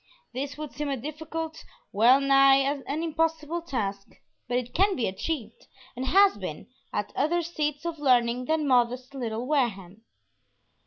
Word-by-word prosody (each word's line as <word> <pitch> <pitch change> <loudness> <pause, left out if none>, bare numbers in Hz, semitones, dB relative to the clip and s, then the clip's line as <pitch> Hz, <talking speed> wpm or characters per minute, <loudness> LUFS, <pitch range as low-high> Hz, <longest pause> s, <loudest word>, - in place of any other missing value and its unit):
This 280 +3 -4
would 305 -2 -7
seem 295 -1 -3
a 275 - -1
difficult, 320 +4 -6 0.3
well 240 +6 +5
nigh 275 0 +6
an 280 +3 -1
impossible 325 0 -1
task, 205 -11 -3 0.4
but 245 0 0
it 245 -1 -4
can 390 +2 +3
be 240 - -1
achieved, 225 +3 -5 0.3
and 255 +2 -4
has 395 +4 +5
been, - - -6 0.3
at - - -3
other 340 +4 +1
seats 300 -2 -3
of 335 -2 -4
learning 250 -3 +2
than 310 0 0
modest 250 0 +1
little 235 -3 -4
Wareham. 220 - -1
275 Hz, 150 wpm, -27 LUFS, 245-315 Hz, 0.4 s, nigh